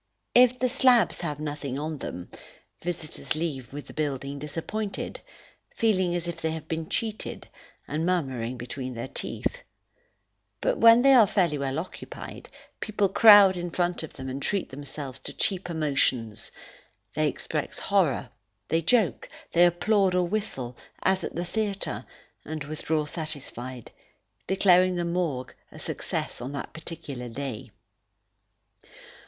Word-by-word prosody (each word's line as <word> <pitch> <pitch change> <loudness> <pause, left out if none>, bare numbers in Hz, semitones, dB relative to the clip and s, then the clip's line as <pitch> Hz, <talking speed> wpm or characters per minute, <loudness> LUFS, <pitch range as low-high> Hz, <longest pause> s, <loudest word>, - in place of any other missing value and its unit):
If 250 0 +6
the 255 - +2
slabs 255 -2 +4
have 150 -4 -3
nothing 145 -3 -4
on 155 0 -3
them, 90 0 -6 0.5
visitors 170 -3 -3
leave 145 -7 -3
the 145 +1 -8
building 140 -2 -2
disappointed, 170 +8 -4 0.6
feeling 185 -6 +2
as 175 -1 -2
if 170 - -5
they 160 - 0
had 160 -1 -5
been 160 -1 -3
cheated, 220 -1 -3 0.4
and 155 +2 -1
murmuring 130 -9 0
between 125 +1 -5
their 115 - -4
teeth; - - -2 1.0
but - - 0
when 230 +1 +8
they 275 0 +7
are 230 -5 +8
fairly 170 -7 +2
well 135 0 -1
occupied, 170 +3 -7 0.3
people 205 -2 +1
crowd 205 -2 +9
in 175 0 -3
front 175 +1 0
of 160 - -7
them 130 -1 -7
and 135 +1 -4
treat 200 +3 -1
themselves 135 -1 -7
to - - -8
cheap 190 -2 0
emotions; 135 -8 0 0.6
they - - +2
express - - -3
horror, - - +2 0.4
they 165 - +2
joke, 215 +3 +2 0.2
they 175 +1 +7
applaud 190 +2 +2
or 180 -1 +2
whistle, 135 - -2 0.3
as 190 -1 +2
at - - -4
the 175 +2 -2
theatre, 200 +1 -2 0.4
and 155 0 -5
withdraw 155 +1 -1
satisfied, 135 -6 -6 0.6
declaring 185 -1 +5
the 175 -1 -1
Morgue 170 -7 -1 0.2
a - - -12
success - - -3
on 130 +3 -5
that 140 - -5
particular 150 -6 -6
day. 130 -2 -5
160 Hz, 140 wpm, -27 LUFS, 140-190 Hz, 1.0 s, crowd